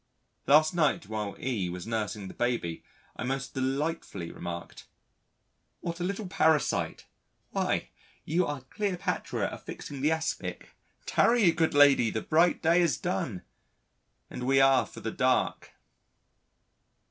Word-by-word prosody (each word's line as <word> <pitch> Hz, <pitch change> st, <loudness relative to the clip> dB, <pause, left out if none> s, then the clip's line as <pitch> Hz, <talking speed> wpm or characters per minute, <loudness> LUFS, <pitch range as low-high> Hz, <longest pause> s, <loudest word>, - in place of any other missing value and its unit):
Last 155 Hz, +3 st, +6 dB
night 170 Hz, -1 st, +1 dB
while 105 Hz, -2 st, -4 dB
E 110 Hz, -9 st, -1 dB
was 90 Hz, 0 st, -6 dB
nursing 110 Hz, -3 st, -3 dB
the -, -, -9 dB
baby 120 Hz, -9 st, -2 dB, 0.3 s
I -, -, -5 dB
most 135 Hz, +2 st, -3 dB
delightfully 135 Hz, -, -2 dB
remarked: 85 Hz, 0 st, -7 dB, 0.9 s
"What 170 Hz, 0 st, -4 dB
a -, -, -2 dB
little 200 Hz, +3 st, -2 dB
parasite 160 Hz, -4 st, +1 dB, 0.5 s
why -, -, -1 dB, 0.4 s
you 170 Hz, +4 st, +1 dB
are 145 Hz, -2 st, -4 dB
Cleopatra 185 Hz, -, -2 dB
affixing 140 Hz, -2 st, -8 dB
the 150 Hz, -, +3 dB
aspic 160 Hz, 0 st, -3 dB, 0.4 s
'Tarry, 230 Hz, -7 st, +4 dB
good 160 Hz, -2 st, 0 dB
lady, 140 Hz, -5 st, +6 dB
the 110 Hz, 0 st, -3 dB
bright 170 Hz, +3 st, +3 dB
day 170 Hz, +2 st, +4 dB
is 165 Hz, -7 st, +2 dB
done, 95 Hz, 0 st, -3 dB, 0.8 s
and 125 Hz, 0 st, -6 dB
we 135 Hz, 0 st, +4 dB
are 135 Hz, -1 st, +5 dB
for -, -, -11 dB
the -, -, -3 dB
dark.'" -, -, 0 dB
135 Hz, 130 wpm, -29 LUFS, 110-165 Hz, 0.9 s, Last